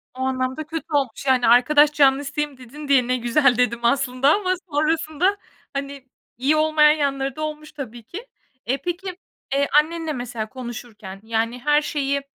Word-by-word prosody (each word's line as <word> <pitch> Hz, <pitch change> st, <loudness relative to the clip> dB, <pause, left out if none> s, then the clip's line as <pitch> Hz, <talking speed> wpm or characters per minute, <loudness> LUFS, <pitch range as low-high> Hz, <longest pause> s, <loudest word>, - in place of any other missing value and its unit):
O -, -, -12 dB
anlamda 260 Hz, +2 st, -2 dB
kötü 325 Hz, -1 st, -5 dB
olmuş 275 Hz, -2 st, -1 dB
yani, 260 Hz, -2 st, +3 dB
"Arkadaş 290 Hz, +5 st, +5 dB
canlısıyım," 285 Hz, 0 st, +1 dB
dedin 275 Hz, +4 st, -10 dB
diye 260 Hz, -3 st, +3 dB
ne 255 Hz, 0 st, +1 dB
güzel 245 Hz, +1 st, +2 dB
dedim 235 Hz, -1 st, +1 dB
aslında 260 Hz, +3 st, +2 dB
ama 370 Hz, -3 st, 0 dB, 0.2 s
sonrasında 315 Hz, +5 st, +1 dB, 0.4 s
hani, 275 Hz, -1 st, -6 dB, 0.3 s
iyi 280 Hz, +5 st, +2 dB
olmayan 310 Hz, -1 st, +4 dB
yanları 275 Hz, -3 st, -1 dB
da 310 Hz, -, -7 dB
olmuş 305 Hz, 0 st, -5 dB
tabii 240 Hz, -5 st, -8 dB
ki. 405 Hz, -, -9 dB, 0.4 s
Eee, 260 Hz, +4 st, 0 dB
peki, 360 Hz, +1 st, -4 dB, 0.4 s
eee, 280 Hz, 0 st, +2 dB, 0.2 s
annenle 325 Hz, -1 st, -5 dB
mesela 240 Hz, -4 st, -5 dB
konuşurken 235 Hz, -6 st, -9 dB
yani, 230 Hz, +2 st, -2 dB
her 295 Hz, +3 st, +3 dB
şeyi 280 Hz, -2 st, -1 dB
275 Hz, 155 wpm, -22 LUFS, 250-305 Hz, 0.4 s, Arkadaş